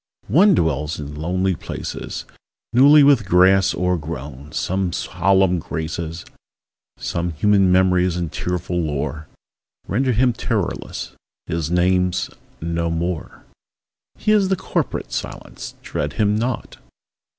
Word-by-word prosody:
One 185 - +6
dwells 75 - 0
in 75 -1 -6
lonely 90 +5 0
places, 80 - -6 0.5
Newly 140 +4 +7
with 135 -8 +4
grass 95 +2 +4
o'ergrown; 75 -5 -3
some 95 -1 -1
solemn 95 -2 +2
graces, 80 +1 -5 0.7
Some 85 0 -3
human 100 +3 +3
memories 90 -1 +3
and 85 -3 -3
tearful 90 0 -2
lore, 75 0 -3 0.6
Render 130 +6 +1
him 125 +2 +3
terrorless: 110 -4 -3 0.3
his 80 -2 -2
name's 90 +1 +1 0.3
"No 85 +1 -2
More." 85 0 -4 0.7
He 215 - +1
is 205 -3 +4
the 190 - +3
corporate - - -3
Silence: - - -6
dread - - -3
him 105 -1 +2
not! 120 +2 -3
90 Hz, 115 wpm, -21 LUFS, 80-100 Hz, 0.7 s, Newly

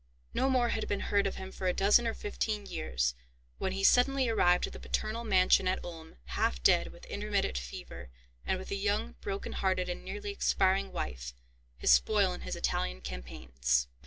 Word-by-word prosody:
No 265 - +2
more 250 -2 +3
had 225 - -2
been 205 - -1
heard 200 -1 +3
of 195 - -4
him 190 0 -7
for 190 - -4
a 180 - +2
dozen 210 +4 +4
or 225 - -1
fifteen 215 - -3
years, 60 - -1 0.5
when 190 - -1
he 195 0 -3
suddenly 260 +4 +4
arrived 180 -6 +3
at - - -9
the - - -8
paternal 225 +2 -2
mansion 190 -3 +4
at 185 - +2
Ulm, 165 -2 -9
half 60 -1 -1
dead - - +5
with - - -14
intermittent 65 - -1
fever, 60 0 -9 0.3
and - - 0
with 190 - -8
a - - 0
young, 205 +3 0
broken 200 0 -4
hearted, 185 -1 0
and 175 - -5
nearly 415 -1 -5
expiring 195 - +1
wife, - - -5 0.4
his 60 - +3
spoil 65 0 +4
in - - -7
his - - -4
Italian - - -1
campaigns. 60 0 -2
190 Hz, 190 wpm, -31 LUFS, -, 0.5 s, dead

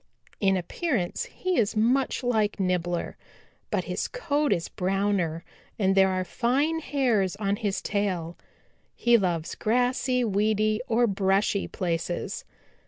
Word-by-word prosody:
In 195 -2 +3
appearance 225 - -2
he 370 -7 -1
is 215 -1 +1
much 255 +5 +2
like 220 -4 +1
Nibbler, 175 -2 -1 0.5
but - - 0
his - - -3
coat 300 - 0
is 170 -1 +1
browner 185 -3 -1 0.3
and 195 -2 +2
there 190 0 +5
are 185 0 0
fine 270 - 0
hairs 240 - +1
on 200 -1 -1
his 205 -4 -2
tail. 185 -5 -1 0.6
He 240 0 +4
loves 175 -6 0
grassy, 250 +2 +1
weedy 215 0 +1
or 235 +1 +3
brushy 195 -1 +1
places. 175 -1 -3
205 Hz, 125 wpm, -26 LUFS, 185-245 Hz, 0.6 s, there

